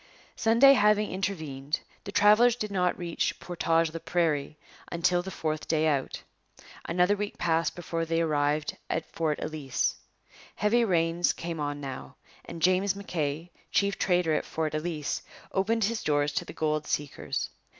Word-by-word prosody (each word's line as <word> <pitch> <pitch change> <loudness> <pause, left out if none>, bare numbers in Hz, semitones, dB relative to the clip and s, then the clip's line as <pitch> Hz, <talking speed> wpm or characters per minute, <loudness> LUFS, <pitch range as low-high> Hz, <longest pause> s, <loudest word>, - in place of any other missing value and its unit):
Sunday 235 +5 +6
having 210 -3 +3
intervened, 155 -7 -3 0.2
the 200 - -5
travellers 210 +4 +5
did 215 -4 -4
not 180 -2 +1
reach 170 -2 -2
Portage 165 -2 0
la 165 - -4
Prairie 155 -4 0 0.3
until 175 +1 +2
the 190 - -7
fourth 155 -4 -3
day 160 -1 +2
out. 140 -3 -1 0.6
Another 180 +4 +2
week 205 0 -4
passed 165 -1 +1
before 165 -1 -3
they 165 0 0
arrived 150 -2 0
at - - -1
Fort 155 -2 -1
Ellice. 150 -4 -2 0.6
Heavy 220 +4 +3
rains 170 -3 +2
came 165 -1 -5
on 145 -1 -2
now, 135 -2 -7 0.3
and 165 -2 -7
James 185 +2 +3
M'Kay, 165 -4 -3 0.2
chief 200 0 +1
trader 175 -3 +2
at - - +1
Fort 160 -1 -2
Ellice, 155 -1 -2 0.3
opened 220 +4 +1
his 220 +2 0
doors 145 -1 +1
to - - -1
the - - -9
gold 155 -1 -1
seekers. 145 -1 -3
165 Hz, 150 wpm, -28 LUFS, 155-195 Hz, 0.6 s, Sunday